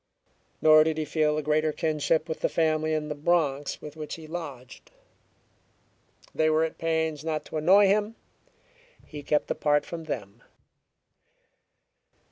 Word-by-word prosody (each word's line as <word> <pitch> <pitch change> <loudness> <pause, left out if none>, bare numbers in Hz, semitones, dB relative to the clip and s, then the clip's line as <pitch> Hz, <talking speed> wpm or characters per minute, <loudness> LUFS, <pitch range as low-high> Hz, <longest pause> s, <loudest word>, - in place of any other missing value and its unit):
Nor 155 0 +7
did 160 0 -1
he 155 - -2
feel 150 0 +1
a 155 - -2
greater 155 +1 +1
kinship 155 +1 0
with 160 - -4
the - - 0
family 155 -1 0
in 150 -1 -2
the 150 - -3
Bronx 145 -2 -1
with 150 0 -9
which 155 -1 -6
he 160 - -11
lodged. 145 -7 -8 1.4
They 155 0 +2
were 155 +1 +2
at 160 - -4
pains 160 -2 -1
not 155 -1 -3
to - - -6
annoy 190 +7 +5
him; 210 +3 +1 0.9
he 150 -2 -9
kept 150 +1 0
apart 150 0 +1
from 165 -1 -7
them. 115 -6 -6
155 Hz, 145 wpm, -26 LUFS, 150-160 Hz, 1.4 s, Nor